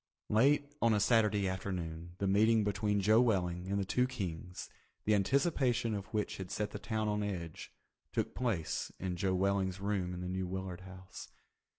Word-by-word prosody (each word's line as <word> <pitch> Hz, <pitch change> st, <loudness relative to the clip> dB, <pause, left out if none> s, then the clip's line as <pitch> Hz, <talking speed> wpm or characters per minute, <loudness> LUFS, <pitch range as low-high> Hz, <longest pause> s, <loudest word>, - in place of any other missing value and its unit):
Late 140 Hz, +7 st, +4 dB, 0.2 s
on 115 Hz, -2 st, +4 dB
a -, -, +2 dB
Saturday 105 Hz, -2 st, +3 dB
afternoon 85 Hz, -3 st, -4 dB
the 100 Hz, -, -1 dB
meeting 110 Hz, +3 st, +4 dB
between 105 Hz, 0 st, +1 dB
Joe 110 Hz, +4 st, +5 dB
Welling 90 Hz, -6 st, +1 dB
and 100 Hz, +1 st, 0 dB
the 100 Hz, -, 0 dB
two 125 Hz, +6 st, +2 dB
Kings, 90 Hz, -7 st, -5 dB, 0.4 s
the 105 Hz, -, +4 dB
anticipation 125 Hz, -, +2 dB
of 100 Hz, -1 st, -4 dB
which 105 Hz, -2 st, -2 dB
had 95 Hz, -2 st, -6 dB
set 105 Hz, +2 st, -2 dB
the 105 Hz, -, -6 dB
town 110 Hz, +1 st, -1 dB
on 105 Hz, 0 st, 0 dB
edge, 90 Hz, -6 st, -5 dB, 0.4 s
took -, -, -1 dB
place 110 Hz, -11 st, -1 dB
in 90 Hz, -1 st, -2 dB
Joe 95 Hz, +1 st, 0 dB
Welling's 95 Hz, 0 st, +1 dB
room 100 Hz, -3 st, -1 dB
in 90 Hz, -, -6 dB
the 90 Hz, -, -4 dB
New 95 Hz, 0 st, -2 dB
Willard 95 Hz, -1 st, -5 dB
House. 95 Hz, 0 st, -10 dB
100 Hz, 180 wpm, -33 LUFS, 95-110 Hz, 0.4 s, Joe